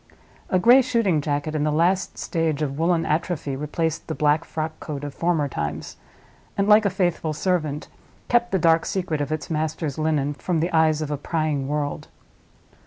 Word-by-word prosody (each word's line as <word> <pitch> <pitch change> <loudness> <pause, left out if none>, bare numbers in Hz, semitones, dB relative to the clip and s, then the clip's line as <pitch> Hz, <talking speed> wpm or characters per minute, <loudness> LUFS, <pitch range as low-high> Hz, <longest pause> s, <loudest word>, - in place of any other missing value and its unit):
A 185 - +3
gray 240 +8 +7
shooting 230 - +1
jacket 145 +1 -2
in 150 -1 0
the 150 - +1
last 175 +5 +1
stage 160 -3 -1
of 140 0 -3
woolen 165 0 +2
atrophy 155 -3 -1
replaced 155 +3 -2
the 160 - -3
black 150 +1 +2
frockcoat 155 -2 -5
of 145 -1 -5
former 165 -3 0
times, 75 - -4 0.6
and, 200 0 +1
like 210 0 +6
a - - +4
faithful 175 -4 -1
servant, 155 -3 -1 0.4
kept 240 0 +2
the 190 - +2
dark 165 -1 +3
secret 175 -6 -2
of 145 - -3
its 155 +1 -4
master's 155 -2 -2
linen 150 -2 0
from 165 +3 -2
the 170 +3 -1
eyes 155 -1 +3
of 150 - -5
a 145 - -1
prying 150 -2 -1
world. 145 0 -3
155 Hz, 175 wpm, -23 LUFS, 150-175 Hz, 0.6 s, gray